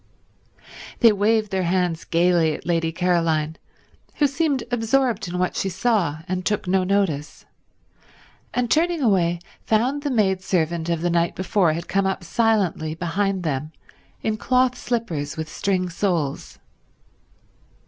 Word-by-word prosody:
They 230 -3 +8
waved 215 +1 +1
their 190 -1 0
hands 175 -2 0
gaily 170 -2 +2
at - - -11
Lady 165 -1 0
Caroline, 165 -3 0 0.6
who 295 - +3
seemed 280 -2 0
absorbed 240 -2 +1
in 175 +1 -4
what 180 0 0
she 195 - -1
saw 190 -6 0
and 185 0 -2
took 210 -1 -1
no 185 +1 +2
notice, 185 -7 -1 1.1
and 245 -2 -1
turning 335 -1 +2
away 175 -6 +2 0.3
found 250 +6 +1
the 290 - -2
maidservant 185 - 0
of 170 -1 0
the 175 - +1
night 170 0 +1
before 185 -3 +1
had 170 +2 -5
come 195 0 +1
up 190 -1 -2
silently 185 -5 0
behind 190 +3 -1
them 155 0 -3 0.5
in 215 -1 0
cloth 255 +2 +2
slippers 180 -14 -3
with 160 0 -3
string 185 +3 -1
soles. 170 -5 -2
185 Hz, 140 wpm, -23 LUFS, 170-220 Hz, 1.1 s, They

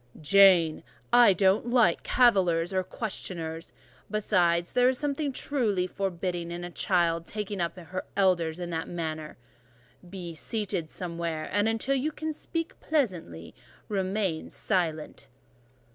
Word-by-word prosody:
"Jane, 175 -1 +5 0.3
I 240 -5 +7
don't 190 +5 +2
like 235 -8 +3
cavillers 190 -8 +3
or 185 - +2
questioners; 170 -6 -4 0.4
besides, 175 -5 +1
there 250 0 +4
is 260 - -1
something 290 0 -1
truly 225 -9 -1
forbidding 180 -2 -3
in 175 +1 -5
a 175 - -6
child 170 -3 +1
taking 210 -3 -4
up 170 +2 -2
her 185 +1 -6
elders 175 -4 +2
in 175 -1 -5
that 160 -1 -3
manner. 155 -3 -5 0.7
Be 175 -3 -7
seated 190 -1 -3
somewhere; 170 -3 -4
and 205 +4 +2
until 225 +4 0
you 275 +3 0
can 315 +1 -4
speak 330 +2 -5
pleasantly, 180 - -2 0.4
remain 190 -4 -1
silent." 160 -5 -2
185 Hz, 130 wpm, -28 LUFS, 170-215 Hz, 0.7 s, I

